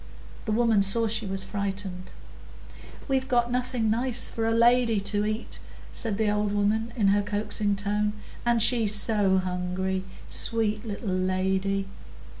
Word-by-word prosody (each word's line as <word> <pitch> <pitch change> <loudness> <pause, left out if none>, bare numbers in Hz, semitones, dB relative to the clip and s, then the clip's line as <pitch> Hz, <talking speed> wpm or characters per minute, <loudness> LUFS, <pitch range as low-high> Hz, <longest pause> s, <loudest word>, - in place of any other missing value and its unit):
The 220 - -2
women 225 -2 +3
saw 195 +4 +3
she 220 -1 -1
was 190 0 -2
frightened. 195 -2 -4 1.0
"We've 265 -1 0
got 240 -1 +1
nothing 250 -3 0
nice 240 +1 +1
for 225 -1 -1
a - - +2
lady 235 -1 +4
to 205 +1 0
eat," 215 +2 -4 0.3
said 220 -5 -2
the 220 -1 +1
old 210 0 0
woman, 215 +3 0
in 205 -4 +3
her 205 +1 +3
coaxing 205 0 -1
tone. 210 +1 -1 0.3
"And 235 -2 +3
she's 225 -4 +2
so 205 -2 +2
hungry, 185 +1 -2 0.2
sweet 215 -2 +1
little 205 0 -4
lady." 190 +1 0
210 Hz, 145 wpm, -26 LUFS, 195-230 Hz, 1.0 s, lady